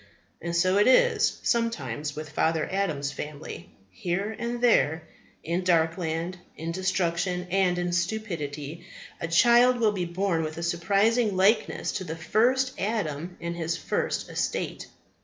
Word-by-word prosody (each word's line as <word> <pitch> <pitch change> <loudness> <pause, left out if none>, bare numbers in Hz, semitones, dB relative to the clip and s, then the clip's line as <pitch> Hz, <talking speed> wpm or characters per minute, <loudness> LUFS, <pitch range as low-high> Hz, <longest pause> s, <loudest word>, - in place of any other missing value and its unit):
And 170 +1 -3
so 185 +3 +3
is 210 - +4
it 485 - +5 0.2
sometimes 150 - -1
with 155 0 -7
father 160 0 +1
Adam's 160 -8 -1
family. 150 +1 -7 0.2
Here 185 - -2
and 240 0 -3
there, 170 -10 +3 0.4
in 170 +3 -1
Darkland, 165 0 0 0.2
in 165 +1 -4
Destruction, 180 0 -1
and 185 -2 +2
in 175 0 -1
Stupidity, 170 -6 -3 0.4
a - - -3
child 240 +7 +5
will 220 -2 +3
be 185 -4 -2
born 175 -1 0
with 155 0 -4
a 170 - -4
surprising 200 +5 +2
likeness 205 +4 +2
to 190 - -3
the 160 -3 -5
first 245 +10 +2
Adam 180 -5 -2
in 170 0 -4
his 170 -1 -2
first - - -2
estate. - - -3
175 Hz, 140 wpm, -27 LUFS, 160-205 Hz, 0.4 s, it